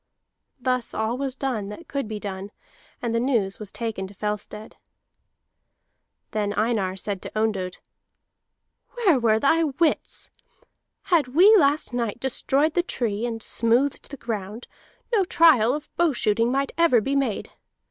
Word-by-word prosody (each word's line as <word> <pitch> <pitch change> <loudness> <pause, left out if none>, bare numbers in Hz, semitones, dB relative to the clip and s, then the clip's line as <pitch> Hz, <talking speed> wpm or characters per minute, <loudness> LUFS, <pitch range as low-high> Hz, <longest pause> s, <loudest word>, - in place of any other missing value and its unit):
Thus 255 -1 -1
all 220 +2 -1
was 270 0 -3
done 255 -7 -2
that 210 +12 -9
could 275 -5 -3
be 215 -1 -5
done, 195 -1 -6 0.5
and 235 -1 -1
the 230 - +2
news 230 -6 0
was 210 -2 -7
taken 220 -5 -4
to 200 - -15
Fellstead. 210 +1 -5 1.6
Then 205 -1 -1
Einar 210 -4 0
said 195 0 -3
to - - -8
Ondott: 195 -5 -1 1.2
"Where 395 - +3
were 220 -2 +3
thy 320 +8 +3
wits? 310 +2 -1 0.7
Had 330 -7 +2
we 400 +6 +8
last 290 - +2
night 235 -2 -2
destroyed 275 +4 +1
the 350 - +3
tree 235 - -2
and 225 -2 -5
smoothed 240 +5 +1
the 280 - -8
ground, 215 -1 -5 0.5
no 415 -4 +4
trial 295 -9 +5
of 300 0 -9
bow 340 -3 +3
shooting 230 0 +1
might 275 +1 0
ever 330 -8 +5
be 270 +6 -1
made. 265 -7 -1
235 Hz, 145 wpm, -24 LUFS, 210-280 Hz, 1.6 s, we